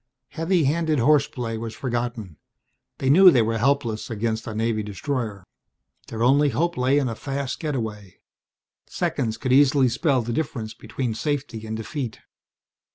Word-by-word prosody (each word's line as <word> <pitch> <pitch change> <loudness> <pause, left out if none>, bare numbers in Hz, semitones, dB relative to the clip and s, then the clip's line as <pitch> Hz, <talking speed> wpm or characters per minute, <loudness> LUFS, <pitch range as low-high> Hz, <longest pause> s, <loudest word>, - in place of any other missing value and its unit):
Heavy 165 +1 +1
handed 155 +2 +1
horseplay 125 -3 +1
was 115 0 -6
forgotten. 120 - -4 0.6
They 135 - -3
knew 180 +7 +8
they 125 -9 +4
were 115 +1 -1
helpless 120 -4 0
against 115 0 -2
a 110 - -5
Navy 110 0 0
destroyer. 105 - -4 0.6
Their 115 0 -3
only 140 +4 +4
hope 170 +8 0
lay 130 +1 +2
in 140 -3 +1
a 115 - -2
fast 135 +2 -4
getaway. 110 - -4 0.7
Seconds 110 -1 -2
could 130 +2 0
easily 135 -1 +5
spell 130 +1 +1
the 120 +1 -3
difference 115 -6 -3
between 115 +2 -4
safety 130 -4 -3
and 110 0 -4
defeat. 120 +1 -5
125 Hz, 150 wpm, -24 LUFS, 110-140 Hz, 0.7 s, knew